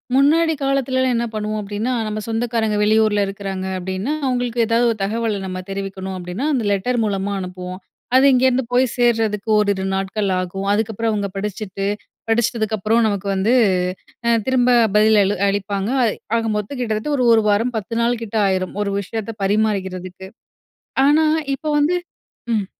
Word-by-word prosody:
முன்னாடி 320 Hz, +4 st, +4 dB
காலத்துலலாம் 260 Hz, -2 st, +1 dB
என்ன 235 Hz, 0 st, 0 dB
பண்ணுவோம் 215 Hz, 0 st, -2 dB
அப்படீன்னா, 210 Hz, +4 st, -3 dB, 0.2 s
நம்ம 215 Hz, 0 st, -3 dB
சொந்தக்காரங்க 225 Hz, -2 st, 0 dB
வெளியூர்ல 215 Hz, -1 st, +3 dB
இருக்கிறாங்க 195 Hz, -1 st, -5 dB
அப்படீன்னா, 190 Hz, +8 st, -3 dB
அவுங்களுக்கு 245 Hz, -2 st, 0 dB
ஏதாவது 235 Hz, +1 st, +2 dB
ஒரு 225 Hz, -, -4 dB
தகவல 220 Hz, 0 st, -1 dB
நம்ம 185 Hz, 0 st, -4 dB
தெரிவிக்கணும் 195 Hz, -1 st, -5 dB
அப்படீன்னா, 180 Hz, +9 st, -4 dB
அந்த 245 Hz, -, 0 dB
லெட்டர் 235 Hz, +5 st, 0 dB
மூலமா 200 Hz, -1 st, -1 dB
அனுப்புவோம். 180 Hz, 0 st, -6 dB, 0.4 s
அது 260 Hz, +1 st, +6 dB
இங்கேருந்து 260 Hz, 0 st, +3 dB
போய் 255 Hz, +1 st, +4 dB
சேர்றதுக்கு 225 Hz, -3 st, +1 dB
ஓரிரு 200 Hz, -2 st, +1 dB
நாட்கள் 195 Hz, +1 st, -1 dB
ஆகும். 185 Hz, +2 st, -4 dB
அதுக்கப்பறம் 220 Hz, +1 st, -1 dB
அவுங்க 205 Hz, -1 st, -1 dB
படிச்சுட்டு 195 Hz, -1 st, -4 dB, 0.4 s
படிச்சிட்டதுக்கப்புறம் 225 Hz, -1 st, +1 dB
நமக்கு 200 Hz, -2 st, -1 dB
வந்து 200 Hz, +5 st, +2 dB, 0.7 s
அ -, -, +4 dB, 0.2 s
திரும்ப 250 Hz, -1 st, +3 dB, 0.2 s
பதில் 215 Hz, +1 st, +5 dB
அளு 200 Hz, +1 st, +1 dB
அளிப்பாங்க. 200 Hz, 0 st, -1 dB
அய் 225 Hz, -, 0 dB, 0.2 s
ஆக 230 Hz, -, +1 dB
மொத்தம் 210 Hz, +6 st, -3 dB
கிட்டத்தட்ட 220 Hz, +2 st, -2 dB
ஒரு 255 Hz, -, +1 dB
1 220 Hz, -, +5 dB
வாரம் 225 Hz, +5 st, +1 dB
10 215 Hz, +2 st, -5 dB
நாளுக்கிட்ட 235 Hz, -2 st, -1 dB
ஆயிரும். 185 Hz, -1 st, -1 dB
ஒரு 205 Hz, -, -1 dB
விஷயத்த 220 Hz, +2 st, -4 dB
பரிமாறிக்கிறதுக்கு. 190 Hz, -3 st, -1 dB, 0.8 s
ஆனா, 300 Hz, +3 st, +4 dB, 0.3 s
இப்போ 305 Hz, +3 st, -4 dB
வந்து 305 Hz, +5 st, +2 dB, 0.6 s
ம். 205 Hz, -3 st, 0 dB
215 Hz, 145 wpm, -20 LUFS, 195-235 Hz, 0.8 s, அது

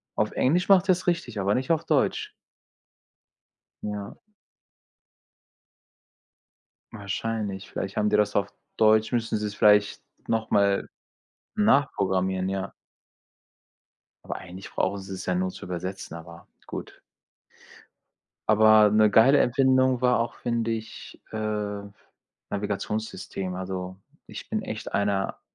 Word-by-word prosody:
Auf -, -, 0 dB
Englisch 175 Hz, +9 st, +1 dB
macht 195 Hz, -1 st, +6 dB
er 185 Hz, -, +8 dB
es 180 Hz, +1 st, -6 dB
richtig, 170 Hz, -11 st, -1 dB
aber 100 Hz, +1 st, +1 dB
nicht 130 Hz, +4 st, -1 dB
auf 160 Hz, -, +1 dB
Deutsch. -, -, +1 dB, 1.5 s
Ja. 105 Hz, -1 st, -5 dB, 2.8 s
Wahrscheinlich. 105 Hz, -1 st, -4 dB
Vielleicht 100 Hz, 0 st, -5 dB
haben 105 Hz, 0 st, +2 dB
die -, -, +4 dB
das 105 Hz, 0 st, +1 dB
auf 100 Hz, -1 st, +1 dB, 0.3 s
Deutsch, 110 Hz, 0 st, +4 dB
müssten 115 Hz, -3 st, 0 dB
sie's 105 Hz, -1 st, -4 dB
vielleicht 105 Hz, -1 st, +4 dB, 0.3 s
nochmal 100 Hz, -3 st, +1 dB, 0.7 s
nachprogrammieren, 95 Hz, -, +1 dB
ja. 95 Hz, 0 st, -3 dB, 1.5 s
Aber -, -, -4 dB
eigentlich 95 Hz, +1 st, -10 dB
brauchen 100 Hz, +1 st, -1 dB
sie's 95 Hz, -1 st, -7 dB
ja 90 Hz, -, 0 dB
nur 95 Hz, +1 st, -1 dB
zu -, -, -10 dB
übersetzen, 90 Hz, -1 st, -5 dB
aber 85 Hz, 0 st, -11 dB, 0.2 s
gut. -, -, -8 dB, 1.5 s
Aber 110 Hz, 0 st, +6 dB
'ne 110 Hz, 0 st, +5 dB
geile 115 Hz, +7 st, +6 dB
Erfindung 130 Hz, 0 st, +3 dB
war 125 Hz, -1 st, +3 dB
auch, 115 Hz, 0 st, -2 dB
finde 115 Hz, -1 st, -1 dB
ich, 110 Hz, -1 st, -7 dB
äh, 105 Hz, -2 st, -3 dB, 0.7 s
Navigationssystem. 100 Hz, -2 st, -4 dB
Also, 95 Hz, 0 st, -5 dB, 0.3 s
ich -, -, -9 dB
bin -, -, -1 dB
echt -, -, -6 dB
einer 100 Hz, -1 st, 0 dB
105 Hz, 115 wpm, -26 LUFS, 95-115 Hz, 2.8 s, er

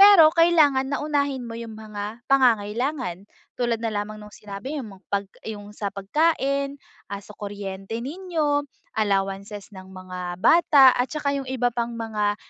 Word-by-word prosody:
pero 395 Hz, -6 st, +10 dB
kailangan 290 Hz, -5 st, +4 dB
na -, -, 0 dB
unahin 280 Hz, -4 st, -1 dB
mo 230 Hz, -, -6 dB
yung 230 Hz, -1 st, -7 dB
mga 215 Hz, +1 st, -7 dB
pangangailangan. 240 Hz, -, +1 dB, 0.3 s
Tulad 240 Hz, -2 st, 0 dB
na 230 Hz, -, -1 dB
lamang 215 Hz, 0 st, -4 dB
no'ng 210 Hz, 0 st, -12 dB
sinabi 210 Hz, +8 st, -6 dB
mo 195 Hz, -3 st, -12 dB
'pag 200 Hz, 0 st, 0 dB, 0.2 s
yung 205 Hz, -1 st, -7 dB
sa 205 Hz, -1 st, -3 dB
pagkain, 275 Hz, +6 st, 0 dB, 0.3 s
ah, 200 Hz, 0 st, -5 dB
sa -, -, -12 dB
kuryente 200 Hz, 0 st, -6 dB
ninyo, 300 Hz, -3 st, -1 dB, 0.3 s
allowances 200 Hz, +1 st, -1 dB
ng 190 Hz, -1 st, -11 dB
mga 185 Hz, -1 st, -6 dB
bata 280 Hz, -, +6 dB
at 245 Hz, +1 st, 0 dB
saka 295 Hz, -2 st, -1 dB
yung 260 Hz, -, -8 dB
iba 245 Hz, -2 st, 0 dB
pang 235 Hz, 0 st, -2 dB
mga 210 Hz, -2 st, -1 dB
230 Hz, 155 wpm, -24 LUFS, 205-280 Hz, 0.3 s, pero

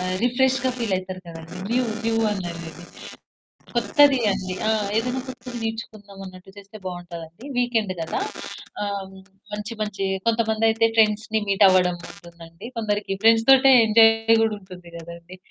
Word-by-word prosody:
అ -, -, -3 dB, 0.2 s
రిఫ్రెష్‌గా 260 Hz, +2 st, +2 dB
ఫీలవుతారు 185 Hz, -4 st, -3 dB
కదండీ! 165 Hz, 0 st, -10 dB
New 250 Hz, +2 st, +2 dB, 0.2 s
new 225 Hz, 0 st, +1 dB, 0.2 s
అన్నారు. 170 Hz, -4 st, -5 dB, 1.1 s
కొత్తది 285 Hz, -3 st, +4 dB
అండి 185 Hz, -1 st, -3 dB, 0.4 s
ఏదైనా 250 Hz, +3 st, -1 dB
కొత్తది 250 Hz, -1 st, -8 dB
నేర్చుకుందామన్నట్టు 200 Hz, -4 st, -8 dB
చేస్తే 200 Hz, +1 st, -12 dB
బావుంటదండి. 175 Hz, +1 st, -8 dB
వీకెండ్ 230 Hz, -5 st, 0 dB
కదా! 165 Hz, -, -3 dB, 0.6 s
ఆహ్, 200 Hz, -1 st, -3 dB, 0.5 s
మంచి 210 Hz, +2 st, -5 dB
మంచి 200 Hz, -2 st, -5 dB, 0.2 s
కొంతమందయితే 225 Hz, 0 st, +2 dB
ఫ్రెండ్స్‌ని 215 Hz, 0 st, +2 dB
మీట్ 200 Hz, 0 st, +3 dB
అవ్వడం 180 Hz, -1 st, +3 dB
ఉంటుందండి 170 Hz, +1 st, -12 dB
కొందరికి 210 Hz, -2 st, -2 dB
ఫ్రెండ్స్ 225 Hz, 0 st, +5 dB
తోటే 270 Hz, 0 st, +7 dB
ఎంజాయ్ 225 Hz, +1 st, +5 dB
కూడా 220 Hz, -, 0 dB
ఉంటుంది 180 Hz, -2 st, -13 dB
కదండీ! 170 Hz, +2 st, -11 dB
210 Hz, 120 wpm, -23 LUFS, 185-225 Hz, 1.1 s, తోటే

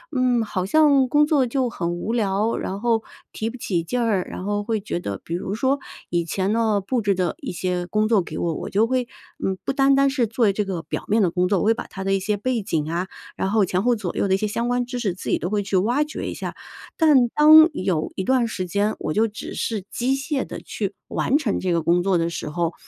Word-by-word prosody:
嗯， 250 Hz, -2 st, +2 dB
好 185 Hz, -3 st, -3 dB
像 280 Hz, +1 st, +4 dB
工 295 Hz, +2 st, +4 dB
作 285 Hz, -5 st, +3 dB
就 255 Hz, 0 st, 0 dB
很 175 Hz, -6 st, -3 dB
无 175 Hz, +6 st, -3 dB
聊， 210 Hz, 0 st, +1 dB
然 195 Hz, +1 st, -4 dB
后 230 Hz, -2 st, +1 dB, 0.3 s
提 220 Hz, +1 st, -2 dB
不 250 Hz, -, -9 dB
起 180 Hz, -7 st, -1 dB
劲 245 Hz, +9 st, -2 dB
儿， 205 Hz, -6 st, 0 dB
然 185 Hz, -, -6 dB
后 205 Hz, 0 st, -1 dB
会 220 Hz, 0 st, -1 dB
觉 190 Hz, -4 st, -3 dB
得 100 Hz, -, -5 dB
比 165 Hz, -, -6 dB
如 190 Hz, +3 st, -3 dB
说， 265 Hz, +4 st, +1 dB, 0.3 s
以 170 Hz, -1 st, 0 dB
前 190 Hz, +4 st, -1 dB
呢， 220 Hz, -3 st, +1 dB
布 240 Hz, +4 st, -1 dB
置 200 Hz, -2 st, +1 dB
的 180 Hz, -3 st, -1 dB
一 -, -, -4 dB
些 180 Hz, 0 st, -2 dB
工 215 Hz, +2 st, +1 dB
作 220 Hz, -4 st, +3 dB
给 -, -, -7 dB
我， 170 Hz, -2 st, 0 dB
我 -, -, -5 dB
就 215 Hz, +3 st, +3 dB
会， 255 Hz, 0 st, +1 dB, 0.4 s
嗯， 190 Hz, 0 st, -1 dB
不 -, -, 0 dB
单 275 Hz, 0 st, +4 dB
单 275 Hz, 0 st, +4 dB
是 255 Hz, -5 st, 0 dB
做 225 Hz, -2 st, +2 dB
这 205 Hz, +1 st, -1 dB
个 180 Hz, -4 st, -3 dB
表 -, -, -5 dB
面 215 Hz, +1 st, +3 dB
的 175 Hz, -4 st, +2 dB
工 180 Hz, 0 st, +1 dB
作， 190 Hz, -1 st, +2 dB
我 -, -, -1 dB
会 225 Hz, -, +5 dB
把 -, -, -7 dB
它 195 Hz, -, -7 dB
的 195 Hz, 0 st, 0 dB
一 195 Hz, -, +2 dB
些 205 Hz, +2 st, -1 dB
背 245 Hz, +1 st, -1 dB
景 155 Hz, -4 st, -1 dB
啊， 180 Hz, +2 st, -2 dB, 0.3 s
然 190 Hz, -, -1 dB
后 215 Hz, -1 st, +3 dB
前 185 Hz, +1 st, 0 dB
后 245 Hz, -1 st, +3 dB
左 195 Hz, -5 st, -4 dB
右 -, -, +1 dB
的 190 Hz, -, +2 dB
一 -, -, +1 dB
些 215 Hz, -, -2 dB
相 235 Hz, +3 st, -2 dB
关 245 Hz, 0 st, 0 dB
知 250 Hz, 0 st, -5 dB
识， 200 Hz, -7 st, -1 dB
自 185 Hz, -, -7 dB
己 -, -, +1 dB
都 175 Hz, -, -3 dB
会 205 Hz, -1 st, 0 dB
去 195 Hz, -1 st, 0 dB
挖 240 Hz, +10 st, +2 dB
掘 300 Hz, -, -6 dB
一 -, -, -3 dB
下。 -, -, -6 dB, 0.4 s
但 290 Hz, -7 st, +5 dB
当 310 Hz, +3 st, +8 dB
有 185 Hz, -, -1 dB
一 190 Hz, -, -2 dB
段 255 Hz, +1 st, +2 dB
时 185 Hz, -5 st, -4 dB
间， 205 Hz, +4 st, 0 dB
我 155 Hz, -, -2 dB
就 225 Hz, +1 st, +3 dB
只 210 Hz, -, -8 dB
是 215 Hz, -5 st, -2 dB
机 260 Hz, +3 st, 0 dB
械 275 Hz, +1 st, -2 dB
地 -, -, -7 dB
去 -, -, -4 dB, 0.2 s
完 285 Hz, -, +1 dB
成 255 Hz, -10 st, -1 dB
这 185 Hz, -1 st, -1 dB
个 165 Hz, -, +1 dB
工 175 Hz, +2 st, +2 dB
作 190 Hz, -2 st, +2 dB
的 165 Hz, 0 st, 0 dB
时 155 Hz, -, -5 dB
候， 170 Hz, +1 st, -1 dB
210 Hz, 285 characters per minute, -23 LUFS, 185-245 Hz, 0.4 s, 当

